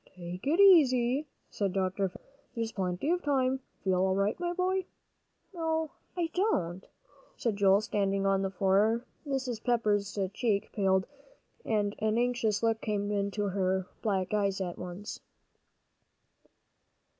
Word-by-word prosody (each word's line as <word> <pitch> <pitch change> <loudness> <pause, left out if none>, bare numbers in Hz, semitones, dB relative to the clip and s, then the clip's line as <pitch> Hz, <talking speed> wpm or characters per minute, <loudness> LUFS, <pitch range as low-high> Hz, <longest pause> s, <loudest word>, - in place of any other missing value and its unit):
"Take 180 +5 -7
it 325 +6 +2
easy," 285 -7 +5 0.2
said 200 -3 -1
Dr. 190 0 0
Fisher, - - -15 0.3
"there's 230 -1 -2
plenty 185 - -1
of 355 0 +1
time. 265 -3 +1 0.2
Feel 185 -2 +2
all 190 0 +2
right, 200 +2 +1
my 350 -1 -1
boy?" 370 +1 0 0.7
"No, 320 -2 -1 0.3
I 335 -2 -1
don't," 190 - 0 0.5
said 230 -4 -1
Joel, 200 0 +4
standing 195 -2 0
on 195 0 +2
the 195 - 0
floor. 200 +5 +2 0.2
Mrs. 260 -5 -2
Pepper's 210 -5 +1 0.2
cheek 205 -3 0
paled, 190 -2 +2 0.6
and 205 -2 0
an 220 +1 +1
anxious 240 -3 +1
look 225 -1 +1
came 205 -1 -1
into 200 0 -1
her 190 -1 0 0.2
black 190 -3 -1
eyes 200 -2 +1
at 180 -2 -4
once. 180 +3 -6
210 Hz, 135 wpm, -30 LUFS, 195-255 Hz, 0.7 s, easy